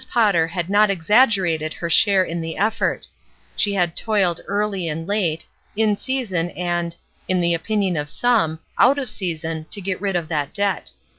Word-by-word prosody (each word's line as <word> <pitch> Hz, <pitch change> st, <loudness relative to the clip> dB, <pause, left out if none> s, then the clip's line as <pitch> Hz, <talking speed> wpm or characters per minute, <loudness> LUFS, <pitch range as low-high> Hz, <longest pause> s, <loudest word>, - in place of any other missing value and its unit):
Potter 200 Hz, -9 st, +3 dB
had 175 Hz, 0 st, -3 dB
not 205 Hz, +2 st, +4 dB
exaggerated 190 Hz, -5 st, +2 dB
her 170 Hz, -, -4 dB
share 190 Hz, +3 st, +4 dB
in 170 Hz, -1 st, -4 dB
the 165 Hz, 0 st, -5 dB
effort; 215 Hz, +3 st, 0 dB, 0.5 s
she 205 Hz, -1 st, +1 dB
had 175 Hz, -3 st, 0 dB
toiled 195 Hz, -6 st, +1 dB
early 200 Hz, -2 st, -1 dB
and 165 Hz, +1 st, -3 dB
late, 180 Hz, -6 st, -1 dB, 0.3 s
in 215 Hz, -1 st, +2 dB
season 200 Hz, -9 st, -1 dB
and 175 Hz, -1 st, -2 dB, 0.2 s
— -, -, -37 dB
in 185 Hz, -1 st, +2 dB
the 170 Hz, -1 st, +2 dB
opinion 195 Hz, +1 st, 0 dB
of 150 Hz, -1 st, -3 dB
some 215 Hz, -8 st, +1 dB
— -, -, -38 dB
out 270 Hz, +4 st, +5 dB
of 260 Hz, -6 st, -3 dB
season 165 Hz, -3 st, -4 dB
to -, -, -4 dB
get 190 Hz, -1 st, -3 dB
rid 195 Hz, -2 st, -1 dB
of 170 Hz, -2 st, -1 dB
that 150 Hz, -2 st, -3 dB
debt. 200 Hz, -1 st, -1 dB
185 Hz, 180 wpm, -21 LUFS, 165-210 Hz, 0.5 s, out